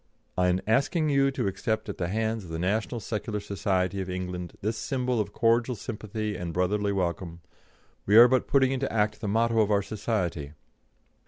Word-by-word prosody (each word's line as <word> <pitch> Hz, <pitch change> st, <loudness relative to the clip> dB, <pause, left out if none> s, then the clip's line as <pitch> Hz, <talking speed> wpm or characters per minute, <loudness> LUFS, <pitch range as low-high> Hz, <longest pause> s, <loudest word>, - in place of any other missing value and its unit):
"'In 90 Hz, 0 st, +1 dB
asking 140 Hz, -, +2 dB
you 140 Hz, -1 st, +3 dB
to 135 Hz, -, -2 dB
accept 110 Hz, +3 st, -2 dB
at 100 Hz, -, -6 dB
the 85 Hz, -, -1 dB
hands 110 Hz, +2 st, -1 dB
of 90 Hz, -, -11 dB
the 80 Hz, -, -4 dB
National 105 Hz, +7 st, -1 dB
Secular 110 Hz, -1 st, -3 dB
Society 100 Hz, -2 st, -1 dB
of 95 Hz, -, -5 dB
England 90 Hz, -1 st, -5 dB
this 110 Hz, +3 st, -1 dB
symbol 125 Hz, -2 st, -1 dB
of 100 Hz, -1 st, -2 dB
cordial 115 Hz, +3 st, +2 dB
sympathy 110 Hz, -1 st, -4 dB
and 85 Hz, -1 st, -5 dB
brotherly 100 Hz, +3 st, +1 dB
welcome, 85 Hz, -2 st, -2 dB, 0.7 s
we 105 Hz, +2 st, +6 dB
are 120 Hz, +1 st, +10 dB
but 130 Hz, 0 st, +1 dB
putting 135 Hz, -2 st, +3 dB
into 135 Hz, 0 st, -1 dB
act 105 Hz, -1 st, 0 dB
the 105 Hz, -, -3 dB
motto 115 Hz, +2 st, +2 dB
of 105 Hz, -1 st, +3 dB
our 100 Hz, -1 st, +2 dB
Society. 90 Hz, -9 st, -3 dB
105 Hz, 180 wpm, -27 LUFS, 95-115 Hz, 0.7 s, are